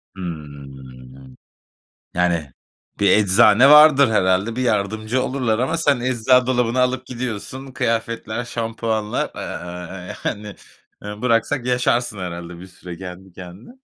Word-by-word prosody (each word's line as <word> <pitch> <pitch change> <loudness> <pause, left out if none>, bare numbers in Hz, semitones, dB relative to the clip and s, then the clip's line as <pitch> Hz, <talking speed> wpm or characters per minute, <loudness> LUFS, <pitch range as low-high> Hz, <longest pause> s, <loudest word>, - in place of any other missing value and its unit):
Hımm. 65 -6 -10 0.8
Yani, 85 -6 0 0.5
bir 100 -2 +4
eczane 105 +6 +5
vardır 150 -3 +7
herhâlde, 100 +3 +1
bir 130 - -1
yardımcı 110 +2 -1
olurlar 125 -5 -1
ama 135 +7 0
sen 145 -6 +1
ecza 125 0 +2
dolabını 125 -1 +1
alıp 130 0 0
gidiyorsun. 125 +2 -6
Kıyafetler, 115 -1 -2
şampuanlar, 115 -2 -3
aaa, 90 +1 -7
yani, 105 -1 -4 0.5
eee, 105 +2 -8
bıraksak 120 +2 0
yaşarsın 125 -3 0
herhâlde 85 -1 -7
bir 95 - -10
süre 90 -1 -11
kendi 95 0 -10
kendine. 90 - -12
110 Hz, 115 wpm, -20 LUFS, 90-125 Hz, 0.8 s, vardır